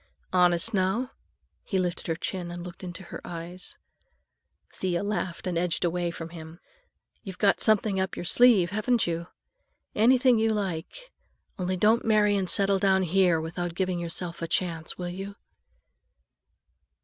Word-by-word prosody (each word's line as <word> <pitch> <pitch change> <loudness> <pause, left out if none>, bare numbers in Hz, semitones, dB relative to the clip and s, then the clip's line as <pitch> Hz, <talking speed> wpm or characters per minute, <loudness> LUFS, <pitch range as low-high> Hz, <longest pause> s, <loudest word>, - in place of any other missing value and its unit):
"Honest, 180 +4 +3
now?" 205 +7 0 0.5
He 195 - -2
lifted 180 0 -2
her 165 - 0
chin 175 +1 -4
and 175 0 -7
looked 180 +1 -10
into 180 0 -6
her - - -9
eyes. 175 +2 -8 1.0
Thea 180 -1 -2
laughed 185 -4 -3
and 175 -2 -1
edged 175 0 -1
away 175 0 -1
from 165 -1 -7
him. 165 0 -11 0.6
"You've 190 -2 -8
got 200 -2 +2
something 215 -2 +3
up 190 0 -2
your - - -6
sleeve, 210 -3 +5
haven't 220 +3 +1
you? 170 0 -3 0.7
Anything 250 +1 +4
you 225 0 +2
like; 210 - -4 0.5
only 185 0 -1
don't 215 +5 +3
marry 210 -2 +3
and 190 -3 0
settle 195 -1 +4
down 190 -1 +3
here 180 -1 +3
without 170 +1 -4
giving 185 -1 -1
yourself 170 0 -3
a 165 - -2
chance, 165 -1 -2
will 180 -1 -4
you?" 195 +3 -7
185 Hz, 150 wpm, -27 LUFS, 175-205 Hz, 1.0 s, sleeve